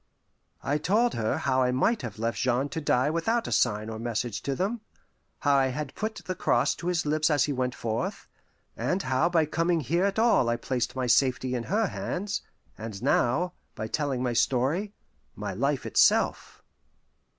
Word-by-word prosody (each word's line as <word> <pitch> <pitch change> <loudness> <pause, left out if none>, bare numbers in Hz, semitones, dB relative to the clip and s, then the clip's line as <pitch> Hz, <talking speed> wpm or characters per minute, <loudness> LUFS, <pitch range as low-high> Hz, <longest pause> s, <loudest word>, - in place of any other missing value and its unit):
I 145 +2 0
told 220 +9 +2
her 110 -1 -1
how 130 0 +1
I 125 -1 +2
might 205 - +1
have 115 -5 -6
left 115 +1 -2
Jean 130 +2 +1
to 160 - -4
die 140 0 +2
without 225 +9 0
a - - -5
sign 110 -3 +1
or 110 0 -6
message 115 -1 -2
to 140 - -2
them, 205 - -2 0.6
how 145 -1 +3
I 135 -1 +4
had 135 +2 -4
put 220 0 -3
the 185 - -2
cross - - +2
to 175 - -6
his 175 -3 0
lips 155 +1 +2
as 150 -2 +3
he 145 - 0
went 125 -1 -1
forth, 115 - -3 0.5
and 185 +2 -1
how 130 +6 +1
by 165 -3 +3
coming 165 +2 0
here 170 +8 +1
at 200 +1 -1
all 225 - +4
I 120 - +2
placed 125 0 -2
my 130 -1 -1
safety 130 +1 +2
in 120 -2 -2
her 215 +4 +1
hands, 195 +1 -3 0.4
and 110 -2 -6
now, 140 +7 +2 0.2
by 110 - -4
telling 135 +1 -1
my 125 -1 0
story, 135 - +1 0.4
my - - -4
life - - -1
itself. - - +2
140 Hz, 185 wpm, -27 LUFS, 125-175 Hz, 0.6 s, I